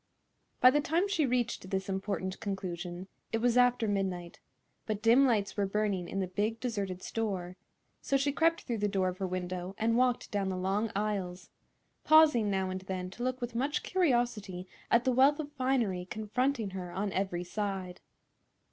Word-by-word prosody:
By 255 - +9
the 295 +2 +2
time 335 +6 +1
she 330 -8 +1
reached 240 -6 -1
this 190 0 -2
important 190 -1 -3
conclusion, 180 -3 -5 0.2
it 225 - +1
was 240 +1 +2
after 245 -2 +4
midnight; 190 -4 -2 0.5
but 215 -2 -1
dim 245 +4 +6
lights 210 -5 +1
were 200 -1 0
burning 195 -3 -1
in 195 - -3
the 190 - 0
big, 210 +5 -2
deserted 200 -7 -3
store, 190 -5 -3 0.5
so 275 - +1
she 280 +1 +1
crept 330 +3 +2
through 235 -3 -3
the 210 - +1
door 190 -2 +1
of 185 +1 -7
her 190 - -1
window 180 +1 -4
and 225 +1 +1
walked 250 0 +1
down 200 -2 0
the 185 - -2
long 195 +4 0
aisles, 195 -3 -3 0.5
pausing 300 -9 +6
now 190 -1 0
and 185 0 -4
then 185 -1 -5
to 235 - -10
look 255 +1 -1
with 240 -1 -4
much 275 +5 -1
curiosity 240 - 0 0.2
at 235 +1 +4
the 260 - +2
wealth 270 +4 +4
of 295 -1 -5
finery 255 -10 0
confronting 220 +1 -1
her 180 -2 -6
on 195 +2 -2
every 185 -2 -1
side. 190 -1 -4
205 Hz, 180 wpm, -31 LUFS, 185-245 Hz, 0.5 s, By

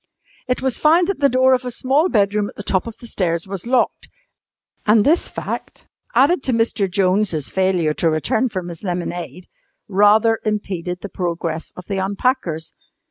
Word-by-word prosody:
It 250 0 -1
was 265 -3 0
found 335 +3 +4
that 395 - -2
the 280 -1 +4
door 260 +1 +4
of 255 0 +1
a 250 - -3
small 275 +8 +1
bedroom 205 - +1
at - - -14
the 205 - -7
top 190 +1 0
of 230 - -8
the 245 - -13
stairs 170 -7 -1
was 195 +2 -5
locked, 250 0 0 0.8
and 210 0 +5
this 325 +4 +2
fact - - -6 0.3
(added 295 +4 +4
to 260 - -1
Mr. 225 -3 +1
Jones' 185 -4 +1
failure 185 -5 +1
to 165 - +1
return 160 - 0
from 185 -4 -5
his 170 +2 -9
lemonade) 175 -3 -4 0.4
rather 210 +3 +4
impeded 185 -4 -3
the 205 - -6
progress 170 -3 -3
of 180 - -10
the 200 - -3
unpackers. 190 - -1
205 Hz, 175 wpm, -20 LUFS, 180-250 Hz, 0.8 s, and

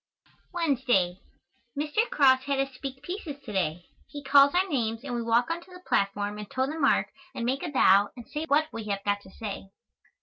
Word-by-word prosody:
Wednesday. 250 - +1 0.6
Mr. 305 +11 0
Cross 260 -2 +4
had 280 -1 0
us 270 0 -1
speak 265 +1 -7
pieces 350 -3 -5
to 220 - -8
day. 175 -2 -1 0.2
He 290 -1 -9
calls 280 +2 +6
our 370 +2 +3
names, 230 -7 -2
and 265 -3 -5
we 240 - -1
walk 235 +5 +2
on 340 +1 -3
to 375 - -18
the 360 0 -13
platform 205 +1 0
and 210 - -8
toe 260 0 0
the 310 +4 -5
mark 275 - +2 0.2
and 235 - -3
make 265 +3 0
a 345 - -3
bow 205 -7 +5
and 240 - -10
say 305 +1 -4
what 305 +1 +3
we 225 -1 -5
have 200 -1 -3
got 205 0 0
to 190 - -15
say. 195 -2 -7
260 Hz, 210 wpm, -27 LUFS, 205-295 Hz, 0.6 s, calls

